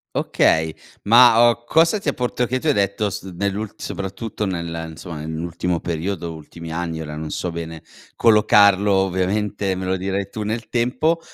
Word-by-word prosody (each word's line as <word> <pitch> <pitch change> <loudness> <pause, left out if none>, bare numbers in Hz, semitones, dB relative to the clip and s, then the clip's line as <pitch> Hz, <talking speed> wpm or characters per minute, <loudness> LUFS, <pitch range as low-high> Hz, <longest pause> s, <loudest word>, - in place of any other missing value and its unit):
Okay, 80 0 +2 0.3
ma, 120 +1 +7
uhm, 120 +1 -8
cosa 165 +6 +3
ti 155 - -1
ha - - -1
port 125 0 -1
che 130 +2 -1
tu - - -12
hai 150 - +4
detto 100 0 0
s - - -5 0.2
nell'ul 100 +1 -2
soprattutto 100 +2 -5
nel 85 -2 -4
insomma, 80 0 -8
nell'ultimo 85 +2 -3
periodo, 85 +1 -3
ultimi 80 +1 -10
anni, 85 -1 -3
ora 75 -1 -6
non 80 0 -5
so 90 - -3
bene, 80 -1 -7 0.3
collocarlo, 105 -2 +5
ovviamente, 95 +1 0
me 95 0 -4
lo 95 +1 0
dirai 95 +1 -2
tu 110 - -5
nel 110 +2 -3
tempo, 135 +8 +1
95 Hz, 170 wpm, -21 LUFS, 85-110 Hz, 0.3 s, ma